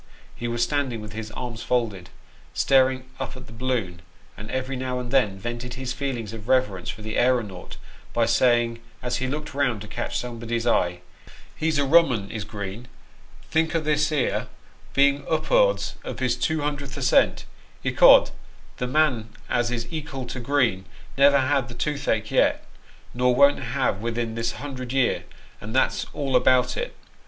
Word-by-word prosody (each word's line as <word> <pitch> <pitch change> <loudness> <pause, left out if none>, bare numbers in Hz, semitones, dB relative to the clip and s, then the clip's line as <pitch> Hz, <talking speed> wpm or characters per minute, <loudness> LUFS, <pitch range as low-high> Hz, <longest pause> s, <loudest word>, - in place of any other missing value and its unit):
He 120 - -5
was 120 0 0
stand 145 0 0
ing 115 - -4
with 105 -1 -8
his 110 0 -6
arms 120 -3 -5
folded, 110 -8 -1 0.5
staring 130 -1 +3
up - - -5
at - - -11
the 115 - -13
balloon, 115 -8 -2 0.3
and 105 +2 -9
every 130 +1 -2
now 130 0 -3
and 125 -1 -6
then 105 -8 +2
Vented 120 +4 -5
his 130 -1 -4
feelings 125 -6 -4
of 110 -1 -9
reverence 125 -9 +1
for 105 - -6
the 110 0 -3
aeronaut, 120 -7 0 0.3
by 115 -1 +2
saying, 120 -1 +2 0.2
as 125 -1 -1
he 130 - -2
looked 150 +3 -4
round 135 -6 +1
to 105 - -8
catch 120 +3 -3
somebody's 115 -1 -3
eye, 90 -6 +1 0.3
" - - -20
He's 155 -1 0
a 145 - +2
rum 165 +3 +6
'un 100 -4 -3
is 110 -3 -4
Green; 105 +3 -7 0.6
think 160 +1 +1
o' - - +3
this 150 -1 +1
here 150 -5 0 0.5
being 140 0 +4
up'ards - - +2
of - - -6
his - - +1
two 160 -1 0
hundredth 145 -1 -3
ascent; 135 -1 +3 0.4
ecod - - +7 0.5
tho 125 - -2
man 130 -6 +1 0.2
as 120 0 +1
is 120 -1 -2
ekal 150 -5 -5
to 130 - -5
Green 120 -7 +1 0.3
never 140 0 +5
had 135 -1 +1
the 120 - -9
toothache 135 -7 -1
yet, - - +2 0.5
nor 125 0 +2
won't 140 +2 +5
havo 130 -7 -1
within 115 0 -2
this 115 0 -2
hundred 130 -3 -6
year, 135 -3 +1 0.4
and - - -6
that's - - +1
all 135 -3 -2
about 125 0 +4
it. - - -4
125 Hz, 175 wpm, -24 LUFS, 115-140 Hz, 0.6 s, ecod